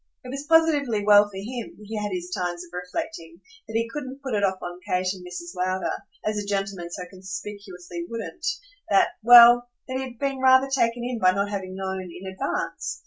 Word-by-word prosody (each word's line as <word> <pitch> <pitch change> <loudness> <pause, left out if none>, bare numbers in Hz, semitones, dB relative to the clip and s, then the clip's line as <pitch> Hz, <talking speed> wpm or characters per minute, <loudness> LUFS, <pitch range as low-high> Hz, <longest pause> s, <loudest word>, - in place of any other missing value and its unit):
It 250 - -9
was 275 +3 -6
positively 290 -10 +3
well 205 0 +7
for 195 - -10
him, 235 +4 -6
he 220 +2 -6
had 210 -1 -2
his 180 -1 -4
times 175 -1 -3
of 175 - -15
reflecting, 180 - -5 0.3
that 220 - -8
he 230 0 +1
couldn't 270 +1 -7
put 265 -3 -3
it 205 -1 +1
off 190 -1 +2
on 175 0 -6
Kate 185 +1 0
and 185 -2 -11
Mrs. 175 -1 -7
Lowder, 185 +1 -1 0.3
as 215 0 0
a 205 - -5
gentleman 195 -3 -2
so 180 +1 -6
conspicuously 185 -2 -7
wouldn't, 275 +9 -5 0.4
that - - +5
well, 240 +1 +9 0.2
that 260 0 -3
he - - -2
had 250 -2 -8
been 275 +1 -2
rather 260 +1 +5
taken 240 -2 +1
in 245 -1 -3
by 185 -2 +5
not 200 +1 -1
having 190 -2 -4
known 190 0 -3
in 185 - -10
advance! 190 0 -3
205 Hz, 200 wpm, -25 LUFS, 185-245 Hz, 0.4 s, well